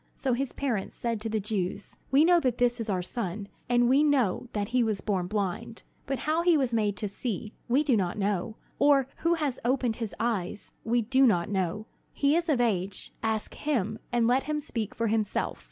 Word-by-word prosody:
So 260 Hz, -3 st, -1 dB
his 265 Hz, +2 st, -1 dB
parents 240 Hz, -9 st, -2 dB
said 230 Hz, -3 st, -2 dB
to 225 Hz, -, -2 dB
the 220 Hz, 0 st, 0 dB
Jews: 200 Hz, -1 st, -3 dB
"We 280 Hz, +4 st, +5 dB
know 350 Hz, 0 st, +6 dB
that 255 Hz, -6 st, 0 dB
this 245 Hz, -1 st, +2 dB
is 225 Hz, -, -4 dB
our 185 Hz, -2 st, 0 dB
son, 200 Hz, 0 st, -3 dB, 0.2 s
and 245 Hz, 0 st, +4 dB
we 265 Hz, +4 st, +5 dB
know 260 Hz, -7 st, +2 dB
that 205 Hz, 0 st, -2 dB
he 250 Hz, 0 st, +2 dB
was 215 Hz, -3 st, 0 dB
born 190 Hz, -4 st, -1 dB
blind. 205 Hz, +2 st, -3 dB, 0.2 s
But 270 Hz, 0 st, -1 dB
how 315 Hz, +2 st, +2 dB
he 345 Hz, -2 st, +4 dB
was 260 Hz, -4 st, 0 dB
made 210 Hz, -3 st, +1 dB
to 210 Hz, -, -2 dB
see, 210 Hz, +1 st, -4 dB
we 265 Hz, +5 st, +3 dB
do 280 Hz, -5 st, +3 dB
not 185 Hz, -3 st, 0 dB
know; 200 Hz, +1 st, -1 dB, 0.2 s
or 280 Hz, -2 st, +5 dB
who 335 Hz, +1 st, +2 dB
has 295 Hz, -6 st, -2 dB
opened 245 Hz, -2 st, +1 dB
his 225 Hz, -4 st, -4 dB
eyes, 210 Hz, -4 st, -2 dB
we 235 Hz, +1 st, +1 dB
do 260 Hz, +4 st, +4 dB
not 175 Hz, -6 st, +2 dB
know. 195 Hz, +1 st, -1 dB, 0.3 s
He 285 Hz, +1 st, +2 dB
is 340 Hz, 0 st, 0 dB
of 280 Hz, -5 st, +3 dB
age; 195 Hz, -5 st, -1 dB
ask 220 Hz, -1 st, -1 dB
him, 220 Hz, -7 st, -1 dB
and 240 Hz, -1 st, +2 dB
let 250 Hz, +3 st, +2 dB
him 305 Hz, 0 st, 0 dB
speak 230 Hz, -8 st, -4 dB
for 230 Hz, -, -1 dB
himself." 220 Hz, -2 st, -1 dB
230 Hz, 210 wpm, -28 LUFS, 205-265 Hz, 0.3 s, know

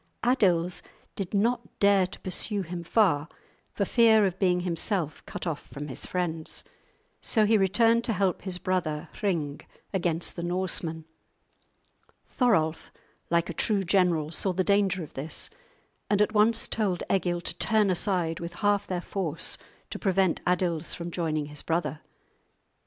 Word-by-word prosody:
Adils 185 Hz, -8 st, +2 dB, 0.3 s
did 195 Hz, -3 st, -4 dB
not 225 Hz, +2 st, 0 dB
dare 200 Hz, -2 st, +4 dB
to -, -, -10 dB
pursue 195 Hz, +2 st, +1 dB
him 170 Hz, 0 st, -6 dB
far, 165 Hz, -6 st, +2 dB, 0.4 s
for 200 Hz, -, -1 dB
fear 220 Hz, -1 st, +5 dB
of 190 Hz, -1 st, -2 dB
being 180 Hz, -2 st, +2 dB
himself 175 Hz, -2 st, -1 dB
cut -, -, -6 dB
off 160 Hz, -4 st, -4 dB
from 145 Hz, +1 st, -7 dB
his 130 Hz, -, -5 dB
friends. 165 Hz, -3 st, -1 dB, 0.6 s
So 220 Hz, -3 st, +4 dB
he 220 Hz, +2 st, +4 dB
returned 225 Hz, +4 st, +3 dB
to 225 Hz, -, 0 dB
help 190 Hz, -2 st, 0 dB
his 185 Hz, -2 st, -3 dB
brother 170 Hz, -5 st, -2 dB
Hring 160 Hz, -8 st, -1 dB, 0.3 s
against 170 Hz, -3 st, -1 dB
the 170 Hz, -, -4 dB
Norsemen. 175 Hz, -2 st, -2 dB, 1.2 s
Thorolf, 165 Hz, -, +1 dB, 0.4 s
like 170 Hz, 0 st, +2 dB
a 175 Hz, -, -4 dB
true 200 Hz, +4 st, +1 dB
general, 175 Hz, -4 st, +2 dB
saw 190 Hz, +2 st, +1 dB
the 185 Hz, +1 st, +1 dB
danger 195 Hz, -2 st, +2 dB
of 155 Hz, -, -11 dB
this, 150 Hz, -, -3 dB, 0.6 s
and 205 Hz, -, +2 dB
at 210 Hz, +1 st, +2 dB
once 220 Hz, +2 st, +4 dB
told 195 Hz, -6 st, -1 dB
Egil 175 Hz, -2 st, 0 dB
to -, -, -2 dB
turn 215 Hz, -3 st, +3 dB
aside 175 Hz, -2 st, 0 dB
with 170 Hz, 0 st, -6 dB
half 205 Hz, +2 st, +1 dB
their 180 Hz, -2 st, -2 dB
force 170 Hz, -4 st, -2 dB, 0.4 s
to -, -, -4 dB
prevent 190 Hz, -3 st, +1 dB
Adils 175 Hz, -2 st, +1 dB
from 170 Hz, 0 st, -6 dB
joining 155 Hz, -3 st, -1 dB
his 150 Hz, 0 st, -6 dB
brother. 160 Hz, -2 st, -2 dB
180 Hz, 150 wpm, -27 LUFS, 165-200 Hz, 1.2 s, fear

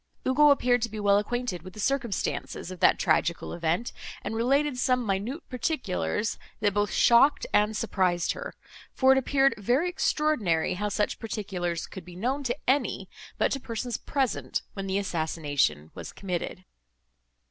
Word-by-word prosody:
Ugo 295 Hz, +3 st, +5 dB
appeared 245 Hz, -4 st, +3 dB
to 230 Hz, -, -1 dB
be 215 Hz, 0 st, -6 dB
well 200 Hz, -1 st, +4 dB
acquainted 240 Hz, -4 st, -3 dB
with 185 Hz, +2 st, -11 dB
the 215 Hz, -, -11 dB
circumstances 235 Hz, -7 st, -2 dB
of 185 Hz, -, -8 dB
that -, -, +5 dB
tragical 170 Hz, 0 st, +1 dB
event, 170 Hz, +7 st, -1 dB, 0.3 s
and -, -, -3 dB
related 270 Hz, +3 st, +1 dB
some 250 Hz, -1 st, +2 dB
minute 215 Hz, -, -2 dB
particulars, 235 Hz, -, -2 dB, 0.2 s
that 205 Hz, -2 st, +1 dB
both 205 Hz, 0 st, +1 dB
shocked 260 Hz, +5 st, +5 dB
and 210 Hz, +1 st, +3 dB
surprised 185 Hz, -6 st, +1 dB
her; -, -, -6 dB, 0.4 s
for 265 Hz, 0 st, +5 dB
it 265 Hz, -, +5 dB
appeared 270 Hz, 0 st, +3 dB
very 250 Hz, -, +2 dB
extraordinary 270 Hz, -, +1 dB
how 205 Hz, +3 st, -2 dB
such 210 Hz, 0 st, -1 dB
particulars 190 Hz, -7 st, -3 dB
could 190 Hz, -, -9 dB
be 175 Hz, +1 st, -12 dB
known 255 Hz, +9 st, -1 dB
to 250 Hz, -1 st, -2 dB
any, 275 Hz, +3 st, +1 dB, 0.3 s
but -, -, +2 dB
to 275 Hz, -, -1 dB
persons, 235 Hz, 0 st, -4 dB
present 270 Hz, -6 st, -1 dB
when 195 Hz, -1 st, -5 dB
the 190 Hz, +1 st, 0 dB
assassination 150 Hz, -, -1 dB
was -, -, -8 dB
committed. 185 Hz, -1 st, -4 dB
215 Hz, 160 wpm, -27 LUFS, 185-260 Hz, 0.4 s, Ugo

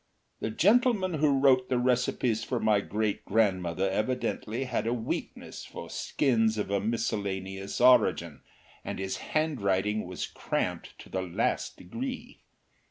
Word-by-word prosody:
The -, -, -2 dB
gentleman 205 Hz, -, +3 dB
who 150 Hz, -3 st, +3 dB
wrote 130 Hz, -2 st, +4 dB
the 125 Hz, -, +2 dB
recipes 125 Hz, -2 st, +1 dB
for 125 Hz, -, -2 dB
my 110 Hz, -2 st, +3 dB
great 105 Hz, 0 st, -2 dB
grandmother 95 Hz, -4 st, +1 dB
evidently 110 Hz, +3 st, -1 dB
had 125 Hz, -3 st, -2 dB
a 120 Hz, -, +1 dB
weakness 115 Hz, -2 st, -5 dB
for -, -, -9 dB
skins 115 Hz, -5 st, +1 dB
of 105 Hz, -1 st, -2 dB
a 100 Hz, -, +2 dB
miscellaneous 100 Hz, -3 st, -2 dB
origin, 110 Hz, -, +4 dB, 0.4 s
and -, -, -5 dB
his 95 Hz, 0 st, -3 dB
handwriting 105 Hz, -, 0 dB
was 90 Hz, -2 st, -4 dB
cramped -, -, -3 dB
to -, -, -16 dB
the 95 Hz, -, -2 dB
last 90 Hz, -2 st, -1 dB
degree. 255 Hz, -, -6 dB
110 Hz, 135 wpm, -29 LUFS, 95-130 Hz, 0.4 s, wrote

